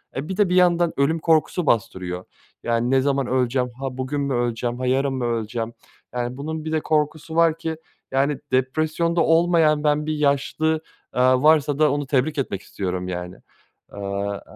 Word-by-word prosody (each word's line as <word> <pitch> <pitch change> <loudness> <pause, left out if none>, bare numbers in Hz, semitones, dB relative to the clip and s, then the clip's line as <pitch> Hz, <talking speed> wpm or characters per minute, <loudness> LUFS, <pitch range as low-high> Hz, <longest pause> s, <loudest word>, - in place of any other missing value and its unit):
Eee, 140 +4 -4
bir 190 - -3
de 205 -4 +3
bir 180 - +1
yandan 175 -2 +4
ölüm 150 +4 +2
korkusu 160 +1 +2
bastırıyor. 95 -7 -1 0.4
Yani, 120 +1 0
ne 135 0 +4
zaman 140 -1 0
öleceğim, 125 0 +1
ha, 135 -1 -4
bugün 135 +2 -2
mü 140 -1 -1
öleceğim, 120 0 -1
ha, 130 - -2
yarın 135 +2 +1
mı 130 -2 -2
öleceğim, 115 0 -2 0.4
yani, 125 +1 -3
bunun 155 +2 -5
bir 155 - -3
de 160 - +1
korkusu 155 +1 -1
var 165 -1 +4
ki, 165 -1 -3 0.4
yani, 140 +2 +1
depresyonda 155 +6 +1
olmayan 165 -2 +3
ben 150 0 +2
bir 155 - -1
yaşlı, 150 +2 +1 0.3
aaa, 130 +1 +3
varsa 150 -2 +4
da 155 -2 +4
onu 145 -1 -2
tebrik 140 +3 +1
etmek 110 -8 -2
istiyorum, 90 -1 -4
yani. 90 0 -5 0.5
Aaa 100 0 -4
140 Hz, 175 wpm, -23 LUFS, 120-155 Hz, 0.5 s, yandan